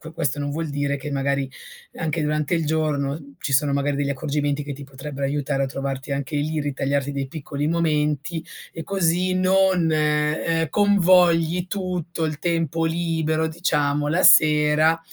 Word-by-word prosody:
Que 160 -1 -10
questo 145 -3 -1
non 145 0 -2
vuol 160 +1 -3
dire 145 0 -1
che 140 +2 -7
magari 140 -1 -1 0.5
anche 160 -1 -2
durante 150 +1 0
il 165 -2 0
giorno 145 -2 -2
ci 140 - -4
sono 140 +1 +2
magari 140 0 0
degli 140 -1 -1
accorgimenti 145 +1 -1
che 145 0 -6
ti 140 +1 -9
potrebbero 140 +1 -5
aiutare 140 0 -1
a - - -2
trovarti 135 +1 -5
anche 140 +2 -3
lì, 155 +2 -1
ritagliarti 140 -1 -1
dei 140 -1 -3
piccoli 145 0 -4
momenti 155 -1 0 0.3
e 165 - -6
così 185 0 0
non, 185 -2 +3
uhm, 150 +1 +1
convogli 180 -4 +3
tutto 180 -4 -3
il 155 -2 -3
tempo 165 -1 0
libero, 160 -1 0
diciamo, 150 -3 0
la 170 +5 +1
sera 155 +1 +5
150 Hz, 160 wpm, -23 LUFS, 140-165 Hz, 0.5 s, sera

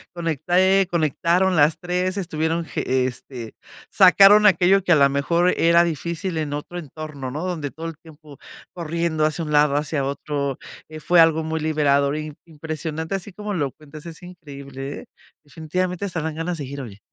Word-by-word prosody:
conecté 175 +4 +2
conectaron 170 +3 +1
las 150 0 +4
3, 180 +1 -2
estuvieron 165 -2 -2
ge 130 -4 -1
este, 125 -2 -7 0.4
sacaron 200 +2 +7
aquello 190 +1 +4
que 180 - +3
a - - +6
la 140 -1 +5
mejor 170 +6 +1
era 170 +1 +5
difícil 170 +2 -3
en 150 -2 -3
otro 150 +4 -6
entorno, 155 -3 -7
¿no? 150 +7 -5
Donde 160 -6 -3
todo 160 +3 -9
el 165 -2 -6
tiempo 155 -3 -15 0.3
corriendo 165 -2 -1
hacia 155 +1 -1
un 150 - -5
lado, 150 -1 +3
hacia 145 -1 -1
otro, 140 -1 -3 0.3
eh, 155 0 -9
fue 175 +2 +3
algo 160 -1 +4
muy 160 0 -3
liberador 145 -2 +1
y 155 0 -5
im 150 - -9
impresionante, 160 +1 -5
así 195 +1 -6
como 210 +2 -6
lo 145 -7 -1
cuentas, 155 0 -13
es 165 +1 -10
increíble, 140 -5 -9
¿eh? - - -14 0.4
Definitivamente 180 +6 -3
se 170 - -6
harán 160 -1 -2
ganas 165 +1 -3
de 145 - -5
ir, 140 +1 -7
oye. 105 -5 -10
160 Hz, 180 wpm, -22 LUFS, 145-175 Hz, 0.4 s, sacaron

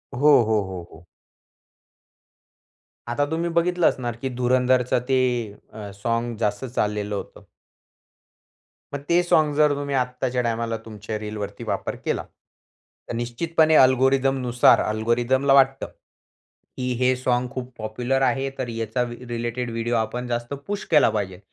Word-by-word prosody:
हो, 145 +4 +4
हो, 110 -1 +1
हो, 90 -2 -6
हो. 85 +2 -16 2.0
आता 145 +5 +1
तुम्ही 165 +1 -1
बघितलं 170 +1 +2
असणार 120 -3 -1
की 135 - -2
धुरंधरचं 125 0 +2
ते 130 - +3 0.6
अ, 105 -2 -8
सॉँग 115 0 -1
जास्त 105 +3 -1
चाललेलं 105 -4 -2
होतं. - - -7 1.5
मग 140 - -3
ते 175 +1 +4
सॉँग 155 -3 +3
जर 150 -1 +4
तुम्ही 140 0 -3
आत्ताच्या 125 0 -1
टायमाला 115 -1 -2
तुमच्या 110 0 -6
रीलवरती 105 -1 -6
वापर - - -3
केला. - - -1 0.9
तर - - -3
निश्चितपणे 155 +7 +1
अल्गोरिथमनुसार 130 -1 +4
अल्गोरिथमला 120 +5 +1
वाटतं, 135 0 +4 0.9
की 125 0 -2
हे 130 0 +3
सॉंग 125 -1 0
खूप 130 -1 -6
पॉप्युलर 120 +5 -2
आहे. 135 0 +1
तर 125 - -2
याचा 115 +1 -2 0.3
रिलेटेड 120 +1 -3
व्हिडिओ 115 +1 -1
आपण 120 +2 -2
जास्त 120 +2 -3
पुश 205 0 -3
केला 150 - +6
पाहिजेल 95 -4 -3
125 Hz, 130 wpm, -23 LUFS, 115-135 Hz, 2.0 s, केला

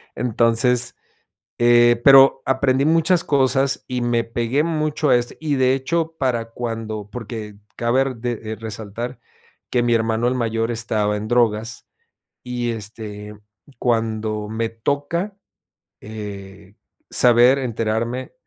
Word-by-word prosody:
Entonces, 120 +1 +1 0.6
eh, 120 0 +5
pero, 135 -1 +7
aprendí 130 0 +2
muchas 165 +2 +3
cosas 135 -1 +1
y 125 -1 -3
me 120 -1 0
pegué 120 +5 -1
mucho 155 -3 -1
a 125 - +6
eso. 120 0 -2
Y 150 -2 -1
de 130 0 +3
hecho, 160 +4 -2
para 120 -4 0
cuando, 115 -3 -5
porque, 110 -3 -7 0.2
cabe 120 +3 +1
r 135 -1 -3
de 120 0 -3
de 110 0 -7
resaltar 115 +3 -7 0.5
que 120 - +1
mi 120 -1 +2
hermano, 115 +1 0
el 130 - 0
mayor, 115 -1 -1
estaba 110 -3 -1
en 105 +1 -5
drogas 115 -1 0 0.6
y, 120 -1 -3
este, 105 -1 -7 0.4
cuando 110 -3 -1
me 115 0 -2
toca, 145 - -3 0.6
eh, 100 -1 -9 0.3
saber, 125 +2 +6
enterarme, 115 +1 -2
120 Hz, 125 wpm, -21 LUFS, 110-130 Hz, 0.6 s, pero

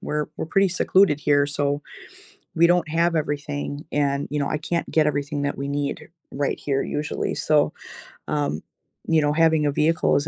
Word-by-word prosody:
we're 150 0 -2
we're - - -3
pretty 195 +3 +3
secluded 180 -3 +3
here, 145 -1 +3
so 145 0 -1 0.7
we 170 +1 +5
don't 175 -1 +2
have 170 +2 +1
everything, 145 -1 -3
and, 140 -1 0
you 150 - -1
know, 140 - -1
I - - -1
can't 170 +2 -3
get 155 -1 +3
everything 145 0 -1
that 145 -1 -2
we 140 0 -3
need 140 0 -3 0.2
right 140 0 -1
here 135 -2 -1
usually. 150 +1 -3
So, 150 -1 +2 0.5
um, 145 - -1 0.5
you 160 -2 +3
know, 145 0 +2
having 160 -1 +3
a 145 - +2
vehicle 155 +3 +2
is 145 +1 +1
150 Hz, 180 wpm, -23 LUFS, 145-160 Hz, 0.7 s, we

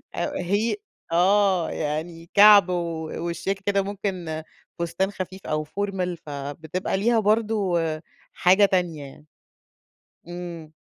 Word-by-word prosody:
آآ - - -1
هي 200 +6 0 0.4
آه، 185 0 +3
يعني 165 +2 -4
كَعْب 205 -2 +8
و 170 -3 -2 0.2
وشياكة 185 +4 -3
كده 200 -1 +2
ممكن 185 -5 -4 0.4
فستان 170 +3 -1
خفيف 190 -1 -7
أو 155 0 -1
formal، 185 +1 -2
فبتبقى 150 +6 -4
ليها 230 +3 +3
برضه 210 -4 +1 0.5
حاجة 190 +3 +5
تانية 175 -6 0
يعني. 140 +2 -13 1.0
إمم. 170 -3 -8
180 Hz, 110 wpm, -24 LUFS, 165-200 Hz, 1.0 s, كَعْب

